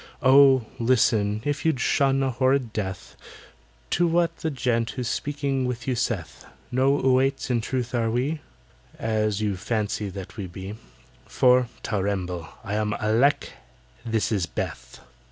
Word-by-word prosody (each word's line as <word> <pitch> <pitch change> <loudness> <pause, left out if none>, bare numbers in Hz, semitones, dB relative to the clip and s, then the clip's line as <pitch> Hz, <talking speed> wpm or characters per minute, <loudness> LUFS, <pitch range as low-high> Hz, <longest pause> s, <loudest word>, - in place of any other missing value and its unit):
"Oh, 135 -2 +6
listen, 110 -3 +2
if 145 -1 -1
you'd 160 -5 +1
shun 135 +1 +2
a 135 - +1
horrid 130 -1 +1
death, 95 -3 -5 0.8
To 175 +1 +3
what 170 0 +1
the 160 - -2
gent 125 -4 0
who's 125 -3 -4
speaking 140 -2 -1
to 120 +1 -4
you - - 0
saith: 115 -7 -3 0.3
No 135 +3 +3
'Oüaits' 130 0 +2
in 120 -2 +1
truth 125 +1 -3
are 115 -2 +1
we, 135 +7 -1 0.6
As 110 -2 0
you 105 -2 0
fancy 105 0 -2
that 95 +2 -9
we 100 -3 -4
be, 95 +3 -7 0.5
For 125 -1 +4 0.2
(ter 105 -3 -1
remble!) 90 -4 -3
I 100 - -4
am 105 0 0
ALECK—this 110 - -1
is 95 -6 0
BETH!" - - -6
120 Hz, 145 wpm, -25 LUFS, 105-135 Hz, 0.8 s, Oh